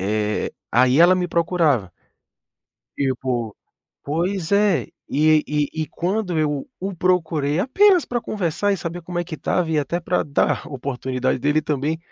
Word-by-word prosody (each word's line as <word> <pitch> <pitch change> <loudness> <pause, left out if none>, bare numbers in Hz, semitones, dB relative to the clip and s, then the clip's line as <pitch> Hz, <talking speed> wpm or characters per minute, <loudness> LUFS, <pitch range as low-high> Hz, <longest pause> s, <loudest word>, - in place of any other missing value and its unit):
eh, 105 +2 -1 0.2
aí 130 +4 +4
ela 175 +2 +7
me 180 -1 -1
procurava. 165 - +1 1.1
Tipo 125 -5 -2 0.5
pois 170 +4 -2
é, 200 -3 +3 0.2
e 155 +1 +3
e 150 -1 0
e - - -4
quando 180 +1 -2
eu 145 -3 -1
o 195 +1 -4
procurei 160 -4 +1
apenas 365 - +4
pra 240 -1 -2
conversar 205 -1 -1
e - - 0
saber 170 0 -6
como 175 +1 -5
é 175 - -1
que 165 - -7
estava 165 +2 -1
e 155 - +1
até 150 +5 -1
pra 180 +1 0
dar 145 - 0
a - - -9
oportunidade 130 -1 -2
dele 145 +4 +2
também 150 +1 -2
160 Hz, 160 wpm, -22 LUFS, 140-180 Hz, 1.1 s, ela